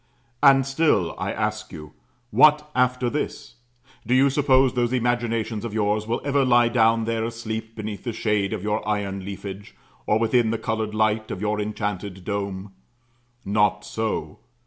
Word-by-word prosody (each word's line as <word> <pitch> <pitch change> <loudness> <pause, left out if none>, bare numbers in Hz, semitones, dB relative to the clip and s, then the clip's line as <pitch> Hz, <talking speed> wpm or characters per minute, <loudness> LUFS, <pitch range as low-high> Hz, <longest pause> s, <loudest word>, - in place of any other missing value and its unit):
And 135 -2 +6
still, 135 - +1
I - - -2
ask - - -3
you, 75 -1 -10 0.4
What 150 0 +5
after 125 0 +1
this? 120 -3 -4 0.5
Do 125 - +1
you 135 +1 +4
suppose 135 -2 +3
those 120 -1 0
imaginations 120 -3 -1
of 115 -2 -5
yours 105 0 0
will 115 - -1
ever 140 -1 +2
lie 120 -2 +4
down 115 -1 +3
there 115 -1 -1
asleep 110 -1 -5
beneath 105 -2 -6
the 120 - -3
shade 105 -3 0
of 105 -4 -4
your 105 +1 -1
iron 100 -2 -2
leafage, 100 0 -8 0.3
or 105 - +3
within 115 +1 +2
the 115 - 0
coloured 110 -1 -3
light 110 0 +1
of - - -5
your 105 +1 -1
enchanted 105 -3 -4
dome? 100 -1 -4 0.7
Not 105 0 +1
so. 110 -2 -3
110 Hz, 160 wpm, -24 LUFS, 105-120 Hz, 0.7 s, And